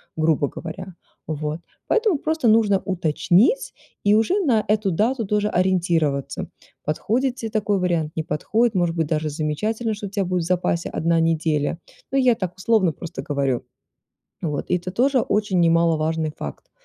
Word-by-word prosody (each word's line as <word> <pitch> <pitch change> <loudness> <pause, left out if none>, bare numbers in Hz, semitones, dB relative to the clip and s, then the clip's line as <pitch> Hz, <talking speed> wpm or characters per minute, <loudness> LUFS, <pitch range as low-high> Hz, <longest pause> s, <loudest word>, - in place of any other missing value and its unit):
грубо 155 -2 +2
говоря. 180 +5 -8 0.3
Вот, 155 0 -3 0.3
поэтому 440 -8 +2
просто 315 -2 0
нужно 215 -3 +4
уточнить 185 - +1 0.3
и 205 +1 +5
уже 285 - +2
на 225 -7 +3
эту 210 -2 +1
дату 225 +7 +1
тоже 210 +1 +1
ориентироваться. 170 -7 0 0.4
Подходит 240 - 0
те 230 -4 -5
такой 210 -2 0
вариант, 165 -4 0
не 160 - -1
подходит, 220 +10 0
может 175 -2 +1
быть 160 -2 0
даже 155 0 -1
замечательно, 210 +10 -2
что 205 -1 -6
у - - -8
тя 200 0 -1
будет 180 -1 -1
в - - -5
запасе 175 -1 0
одна 165 +1 +1
неделя, 160 -2 +1 0.3
ну 270 - +1
я 255 -3 +4
так 180 -4 -4
условно 190 -3 +2
просто 170 +3 -7
говорю. 140 -4 -1 0.8
Вот, 150 -4 -3
и 180 - +2
это 180 +1 -5
тоже 255 +7 +2
очень 205 -4 0
немаловажный 165 -1 +2
факт, 70 -2 -8
180 Hz, 160 wpm, -22 LUFS, 160-215 Hz, 0.8 s, и